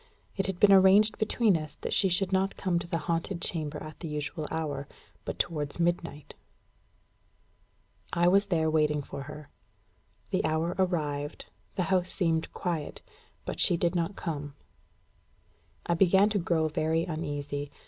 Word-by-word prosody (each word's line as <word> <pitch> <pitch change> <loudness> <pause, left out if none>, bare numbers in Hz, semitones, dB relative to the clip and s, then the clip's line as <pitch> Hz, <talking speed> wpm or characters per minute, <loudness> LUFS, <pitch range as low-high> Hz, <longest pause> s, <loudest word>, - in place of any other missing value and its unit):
It 195 -2 -1
had 190 -2 -3
been 205 - +6
arranged 195 +3 +6
between 215 -2 +3
us 155 -3 -4
that - - -2
she 195 - +4
should 190 +2 +1
not 190 +1 +1
come 180 -3 0
to 170 - -7
the 170 - -1
haunted 165 +1 -1
chamber 155 -3 -3
at 155 0 -10
the 170 - -5
usual 150 +1 -3
hour, 145 -4 -3 0.4
but - - -4
towards 150 -2 -2
midnight. 170 -3 -1 1.8
I 175 0 +3
was 200 +3 +4
there 165 -4 +1
waiting 150 -2 +2
for 140 - -7
her. 150 -1 -10 0.8
The - - +1
hour 160 +2 0
arrived; 150 -5 -2 0.2
the 185 - +1
house 185 -1 +2
seemed 165 -4 0
quiet; 170 -5 -4 0.4
but - - -5
she 175 - +4
did 170 0 +1
not 175 +2 -1
come. 145 -5 -5 1.3
I 170 - +1
began 190 +3 +5
to 205 -1 0
grow 165 -3 +1
very 160 +1 0
uneasy. 145 -3 -4
165 Hz, 155 wpm, -29 LUFS, 150-185 Hz, 1.8 s, been